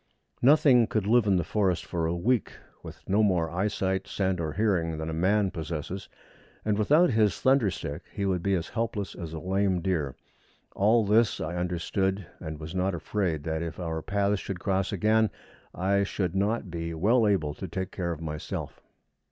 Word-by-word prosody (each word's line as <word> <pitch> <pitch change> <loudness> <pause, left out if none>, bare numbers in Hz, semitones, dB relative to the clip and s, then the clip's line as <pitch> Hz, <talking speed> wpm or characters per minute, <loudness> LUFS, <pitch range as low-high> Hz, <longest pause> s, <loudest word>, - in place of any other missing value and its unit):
Nothing 130 -3 +6
could 110 -4 -1
live 115 +1 +4
in 100 - +4
the 90 - +1
forest 95 -5 0
for 85 -2 -1
a 85 - -1
week 115 +6 0 0.3
with - - -12
no 100 +3 +3
more 90 -6 +2
eyesight, 95 +1 -1
scent, 95 -2 -1
or 80 -3 -2
hearing 85 -5 +1
than 80 +1 -4
a - - -4
man 95 +4 +2
possesses, 80 +3 -5 0.6
and 105 -1 +2
without 145 +11 +4
his 110 -3 +2
thunder 130 -5 +4
stick 75 -3 -5
he 100 - -3
would 95 -3 0
be 100 +2 +1
as 85 -2 -3
helpless 110 -3 -3
as 85 -4 -7
a 80 - -5
lame 95 +2 0
deer. 80 -7 -1 0.6
All 110 +3 +4
this 110 +2 +3
I 80 +2 -3
understood, 90 +2 -1
and 80 -3 -6
was 80 +1 -7
not 95 0 0
afraid 85 -4 -2
that, 80 0 -2
if 85 +1 -5
our 80 -2 -3
paths 100 +1 0
should 95 -2 -5
cross 95 +1 0
again, 110 +2 +3 0.4
I 100 +2 +1
should 95 -3 -1
not 100 0 0
be 85 -1 -4
well 110 +7 +3
able 80 -8 +1
to 95 - -7
take 95 +2 -4
care 90 -2 -3
of 80 -1 -5
myself. 75 -2 -5
95 Hz, 185 wpm, -27 LUFS, 85-105 Hz, 0.6 s, Nothing